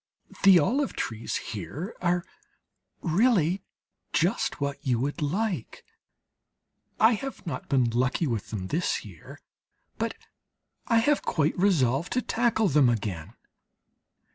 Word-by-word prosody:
The 195 -2 +8
olive 260 - +1
trees 110 0 -4
here 115 - -5
are 175 0 +1 0.8
really 185 -1 +2 0.5
just 220 +6 +1
what 140 0 -3
you 125 -5 +1
would 145 +6 -2
like. 190 +7 -2 1.1
I 220 +2 +6
have 270 +2 -6
not 140 -7 -5
been 130 -4 +3
lucky 125 +7 +1
with 115 -7 -3
them 95 -4 -5
this 170 +4 -1
year; - - -12 0.6
but - - -1 0.7
I 230 - +3
have 290 +6 +3
quite 155 0 0
resolved 165 -6 +2
to 250 - +1
tackle 230 -2 +1
them 145 -6 +4
again. 100 -5 -3
160 Hz, 120 wpm, -27 LUFS, 130-210 Hz, 1.1 s, The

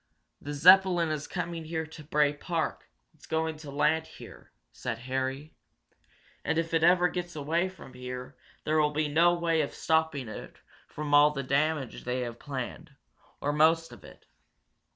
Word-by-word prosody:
"The 145 0 -5
Zeppelin 180 +1 +6
is 150 -1 -3
coming 170 -2 -4
here 160 0 -3
to 160 -1 -12
Bray 150 -1 +2
Park 165 +2 -3 0.2
it's 155 - -18
going 160 0 -1
to 150 -2 -10
land 155 +3 +1
here," - - -13 0.2
said 115 - -4
Harry. 130 +4 -3 0.9
"And 160 - 0
if 165 0 -1
it 165 - +3
ever 180 +1 +5
gets 175 -1 -5
away 165 +5 0
from 185 -8 -13
here 125 +1 -7 0.3
there 155 +1 +1
will 150 0 +1
be 155 +1 0
no 170 +4 +4
way 165 -2 +1
of 145 - -4
stopping 160 -5 0
it 110 - -8 0.3
from 150 0 -6
doing - - -1
all 145 +1 +7
the 140 -2 -4
damage 140 0 -1
they 125 +1 -2
have 120 -1 -5
planned, 145 +3 -6 0.5
or 145 - 0
most 165 +2 +3
of - - -13
it. - - -15
155 Hz, 170 wpm, -29 LUFS, 140-165 Hz, 0.9 s, all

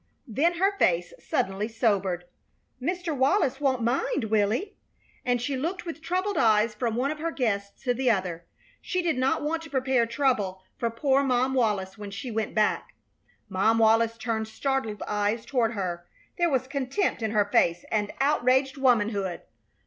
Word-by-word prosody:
Then 300 +10 +1
her 390 +3 +2
face 175 0 +2
suddenly 195 +2 -1
sobered. 200 -6 0 0.6
"Mr. 350 +2 -2
Wallis 275 0 +2
won't 260 -4 +1
mind, 270 - 0
will 205 -2 +3
he?" 385 - -2 0.5
And 245 -1 +1
she 270 +4 -2
looked 340 +8 -3
with 330 -1 -6
troubled 370 +5 -1
eyes 215 0 +4
from 225 +1 -2
one 265 +4 0
of 305 - -6
her 330 +2 -1
guests 200 -9 -2
to 250 -2 +1
the 255 +1 +1
other. 185 -6 0 0.4
She 365 -1 -2
did 335 -4 +1
not 260 +3 +1
want 320 +2 -1
to 325 - -10
prepare 260 -3 +1
trouble 225 -7 0
for 235 - -1
poor 265 +4 +2
Mom 260 -1 +1
Wallis 210 -6 0
when 205 -1 -6
she 225 +5 -6
went 220 0 -2
back. 215 -1 +1 0.5
Mom 205 +4 +2
Wallis 225 +1 +4
turned 225 -1 -2
startled 225 -2 -2
eyes 210 +2 -1
toward 235 -4 +1
her. 180 -4 -4 0.3
There 345 -1 +2
was 260 -3 +1
contempt 270 - -1
in 220 - 0
her 210 -1 +2
face 175 -4 +2
and 210 -2 0
outraged 270 -1 +2
womanhood. 210 -8 +1
240 Hz, 170 wpm, -27 LUFS, 210-275 Hz, 0.6 s, eyes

